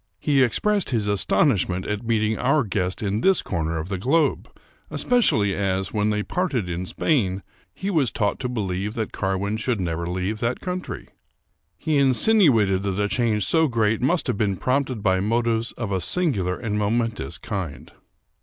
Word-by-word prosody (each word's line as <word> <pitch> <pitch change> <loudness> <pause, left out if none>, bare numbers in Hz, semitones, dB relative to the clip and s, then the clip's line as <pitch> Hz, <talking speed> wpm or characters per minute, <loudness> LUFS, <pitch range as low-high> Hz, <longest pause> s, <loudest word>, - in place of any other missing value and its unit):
He 140 -3 +2
expressed 200 - +1
his 110 -5 0
aston 100 - +2
ishment 95 -3 -2
at 105 0 -2
meeting 110 -1 +1
our 140 +3 +2
guest 90 -1 -2
in 105 +2 -1
this 190 -1 +3
corner 80 -3 -2
of 80 +1 -4
the 95 -2 -3
globe, 145 - +1 0.4
especially 110 - +2
as, 95 -1 -1
when 105 0 +1
they 105 0 0
parted 140 - -1
in 90 +1 -4
Spain, 100 - 0 0.3
he 195 +1 -4
was 150 - +2
taught 105 -1 -1
to 125 - -3
believe 100 -3 -3
that 110 -2 -3
Carwin 95 +2 -1
should 115 0 -1
never 85 -1 -2
leave 95 +4 -2
that 120 +2 -1
country. 180 0 -5 0.7
He 155 +4 0
insinuated 130 - +4
that 100 0 -2
a 105 - +2
change 110 -3 0
so 160 -1 +3
great 110 -4 +1
must 160 +7 +1
have - - -1
been 100 -3 0
prompted 130 -3 -1
by 95 -1 +2
motives 115 +2 0
of 115 -4 -5
a 95 -1 0
singular 100 - 0
and 105 -3 -2
momentous 110 - -1
kind. 85 -9 -6
105 Hz, 175 wpm, -23 LUFS, 95-130 Hz, 0.7 s, insinuated